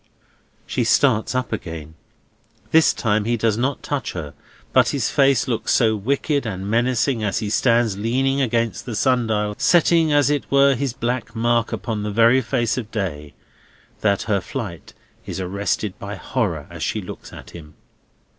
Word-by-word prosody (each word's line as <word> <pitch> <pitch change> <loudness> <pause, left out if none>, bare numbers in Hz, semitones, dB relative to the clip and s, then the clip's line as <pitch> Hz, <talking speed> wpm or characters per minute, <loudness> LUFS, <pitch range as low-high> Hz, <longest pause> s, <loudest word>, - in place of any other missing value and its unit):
She - - -1
starts 110 +3 +2
up 130 -2 -1
again. 80 -6 -6 0.8
This 160 0 +5
time 105 -2 0
he 120 +1 0
does 110 -1 +1
not 130 +5 -2
touch 145 -2 -3
her. 75 -5 -6 0.4
But - - +5
his - - -1
face 135 -2 +3
looks 120 -3 -1
so 110 -3 +3
wicked 140 +6 0
and 95 -4 -5
menacing, 120 +2 +1
as 100 - 0
he 105 -2 -2
stands 115 -4 +2
leaning 135 +5 +1
against 115 -3 -1
the 115 - -4
sun 125 +1 +2
dial 105 -1 0
setting, 165 -2 +4
as 145 0 +3
it 145 -2 -2
were, 140 0 +5
his 135 -1 -2
black 120 -1 -3
mark 115 0 +1
upon 110 0 -3
the 105 - -3
very 115 +5 +4
face 120 -1 -1
of 115 -3 -7
day—that 95 +2 -5
her 100 -3 0
flight 100 -11 -7 0.3
is - - -4
arrested 100 +2 -2
by 100 0 -6
horror 90 - -2
as - - -9
she - - -1
looks - - -9
at - - -11
him. 75 -3 -12
115 Hz, 165 wpm, -21 LUFS, 105-130 Hz, 0.8 s, This